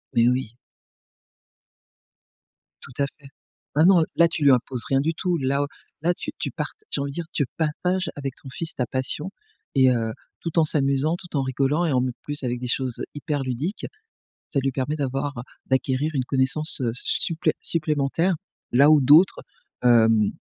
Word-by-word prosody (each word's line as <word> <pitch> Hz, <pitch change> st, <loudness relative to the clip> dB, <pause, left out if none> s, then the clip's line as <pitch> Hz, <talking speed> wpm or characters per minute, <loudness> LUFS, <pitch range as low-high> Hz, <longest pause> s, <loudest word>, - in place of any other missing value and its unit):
Mais 115 Hz, 0 st, +5 dB
oui. 125 Hz, -2 st, -1 dB, 2.3 s
Tout -, -, -10 dB
à -, -, +3 dB
fait. 140 Hz, -, -15 dB, 0.5 s
Maintenant, 170 Hz, +3 st, +6 dB
là 170 Hz, -, +5 dB
tu 165 Hz, -2 st, -3 dB
lui 140 Hz, -, +7 dB
imposes 125 Hz, 0 st, +1 dB
rien 135 Hz, 0 st, +2 dB
du 160 Hz, +3 st, 0 dB
tout, 175 Hz, +1 st, -1 dB
là 140 Hz, 0 st, 0 dB
au -, -, -3 dB, 0.3 s
là 175 Hz, +2 st, +2 dB
tu 190 Hz, -, -6 dB
tu -, -, -1 dB
part -, -, -4 dB, 0.2 s
j'ai -, -, +1 dB
envie 140 Hz, -, -3 dB
de -, -, -10 dB
dire, 170 Hz, -2 st, -3 dB
tu 145 Hz, -, +1 dB
partages 180 Hz, +4 st, -1 dB
avec 140 Hz, -2 st, -4 dB
ton 135 Hz, -, -10 dB
fils 165 Hz, +5 st, -3 dB
ta 125 Hz, -, -1 dB
passion 135 Hz, +8 st, -2 dB, 0.4 s
et 130 Hz, -1 st, +5 dB
heu, 115 Hz, -2 st, -1 dB, 0.3 s
tout 165 Hz, 0 st, -4 dB
en 160 Hz, -, +4 dB
s'amusant, 140 Hz, +1 st, +1 dB
tout 175 Hz, -4 st, -9 dB
en 135 Hz, -, +2 dB
rigolant 135 Hz, +6 st, 0 dB
et 155 Hz, -, 0 dB
en 125 Hz, -1 st, +2 dB
m 130 Hz, -, -1 dB
plus 145 Hz, -1 st, -5 dB
avec 125 Hz, -1 st, -2 dB
des 125 Hz, -, -4 dB
choses 125 Hz, 0 st, -2 dB
hyper 145 Hz, -1 st, -3 dB
ludiques. 135 Hz, -, -3 dB, 0.7 s
Ça 140 Hz, -, +2 dB
lui 135 Hz, 0 st, 0 dB
permet 135 Hz, +4 st, -2 dB
d'avoir, 140 Hz, 0 st, -3 dB
heu, -, -, -3 dB, 0.3 s
d'acquérir 130 Hz, +3 st, 0 dB
une 130 Hz, -3 st, 0 dB
connaissance, 135 Hz, +4 st, +2 dB
heu, 120 Hz, -2 st, 0 dB
s 125 Hz, -, 0 dB
su -, -, +1 dB
supplé 165 Hz, -2 st, +1 dB
supplémentaire 155 Hz, +2 st, +1 dB, 0.4 s
là, 140 Hz, +5 st, +6 dB
où 150 Hz, -2 st, +6 dB
d'autres, 155 Hz, +8 st, +6 dB, 0.4 s
hem, 115 Hz, -3 st, +4 dB
140 Hz, 190 wpm, -24 LUFS, 130-155 Hz, 2.3 s, lui